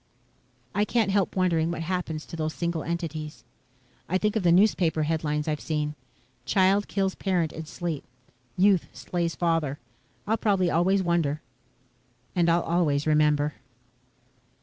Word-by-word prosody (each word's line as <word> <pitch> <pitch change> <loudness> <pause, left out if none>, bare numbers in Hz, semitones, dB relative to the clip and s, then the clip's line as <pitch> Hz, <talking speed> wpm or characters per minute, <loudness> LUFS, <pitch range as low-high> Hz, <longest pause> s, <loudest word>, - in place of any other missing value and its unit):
_' - - -40 0.7
"I 205 - +2
can't 215 -1 +1
help 195 -2 +1
wondering 170 -3 +2
what 170 -1 -3
happens 165 -3 -3
to - - -8
those 155 -1 -3
single 170 -2 -2
entities. 160 -3 -4 0.7
I 185 - +2
think 210 +2 0
of 220 - +1
the 175 -2 +4
newspaper 175 -4 +3
headlines 150 -1 -1
I've 150 -1 -1
seen: 150 -1 -2 0.5
Child 195 +6 +3
Kills 195 -1 0
Parents 175 -5 -1
in 160 -1 -7
Sleep. 165 -3 -4 0.5
Youth 190 -1 +4
Slays 170 -2 -2
Father. 165 -5 0 0.5
I'll 220 +2 +1
probably 195 -5 +2
always 190 +4 +2
wonder 165 -4 0 0.9
and 170 -1 +3
I'll 170 +1 +3
always 155 -4 +1
remember...." 150 -1 +3
170 Hz, 145 wpm, -26 LUFS, 155-185 Hz, 0.9 s, the